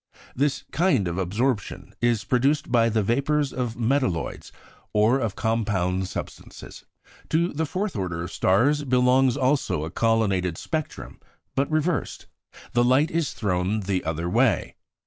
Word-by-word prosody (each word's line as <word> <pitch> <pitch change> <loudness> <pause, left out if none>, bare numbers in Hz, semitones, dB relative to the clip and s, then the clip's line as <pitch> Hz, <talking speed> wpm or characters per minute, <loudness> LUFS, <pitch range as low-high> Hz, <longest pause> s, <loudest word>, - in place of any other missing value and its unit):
This 140 +1 0
kind 155 - +2
of 85 +2 -3
absorption 105 +5 -2
is 120 -2 +2
produced 135 +5 +1
by 115 -2 +4
the 110 -1 +1
vapours 140 +6 0
of 120 -3 -3
metalloids 120 - -1 0.4
or 110 +5 +3
of 115 -6 -2
compound 100 -5 0
substances. - - -8 0.5
To 170 +3 +1
the 160 +2 -1
fourth 195 +3 -3
order 85 -4 -3
of 85 - -6
stars 135 - +2
belongs 125 0 +3
also 130 - 0
a 80 - -7
colonnaded 100 -6 +1
spectrum, 155 -2 -5 0.3
but 135 +1 0
reversed; 155 -1 -1 0.5
the 120 - +3
light 130 +6 +3
is 165 -3 -1
thrown 100 0 -1
the 95 -1 -1
other 80 +1 -2
way. 90 - +1
120 Hz, 140 wpm, -24 LUFS, 95-140 Hz, 0.5 s, by